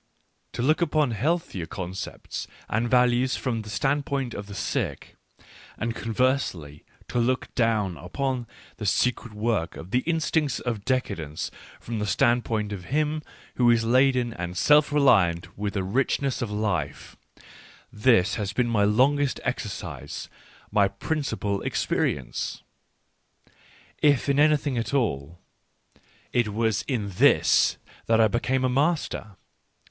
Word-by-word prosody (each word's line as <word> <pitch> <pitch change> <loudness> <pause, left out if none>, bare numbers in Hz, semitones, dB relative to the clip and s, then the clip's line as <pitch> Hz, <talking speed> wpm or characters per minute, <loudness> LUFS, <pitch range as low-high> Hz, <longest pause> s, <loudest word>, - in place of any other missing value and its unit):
To 120 - -2
look 155 +6 +3
upon 150 -5 +2
healthier 115 - -1
concepts 95 +2 -6 0.2
and 115 +3 0
values 125 +1 +3
from 115 -4 -2
the 105 - -10
standpoint 135 0 -1
of 100 - -6
the 100 - -8
sick, - - -3 0.6
and 115 0 -2
conversely 115 - -1 0.3
to 120 - 0
look 130 +2 0
down 110 -7 +1
upon 120 - -3 0.3
the 105 - -3
secret 125 +2 +1
work 105 -5 -1
of 90 +4 -10
the 125 - +3
instincts 160 -3 0
of 115 -5 -4
decadence 85 - -2 0.3
from 115 -1 -5
the 105 - -2
standpoint 110 +1 +1
of 90 -3 -7
him 150 - 0 0.4
who 120 -1 +4
is 115 -1 +4
laden 125 0 +3
and 85 -1 -5
self 150 - +5
reliant 100 - +3
with 100 0 -3
the 95 - 0
rich 120 +9 +1
ness 135 -2 -2
of 120 - -2
life 105 -3 -2 0.4
— - - -19 0.2
this 105 -3 +3
has 100 -1 -3
been 125 -2 +1
my 110 -3 +2
longest 130 +6 +2
exercise, 125 -5 -5 0.4
my 100 -2 +4
principal 105 -2 -2
experience. - - -2 1.4
If 145 -3 +3
in 140 0 +2
anything 145 -4 +3
at 120 +4 -2
all, 85 - -1 1.0
it 120 -2 +2
was 110 0 +1
in 110 -7 -2
this 90 - +4 0.3
that 115 0 +4
I 110 - +6
became 130 +4 0
a - - +4
master. 135 - 0
120 Hz, 135 wpm, -26 LUFS, 100-135 Hz, 1.4 s, I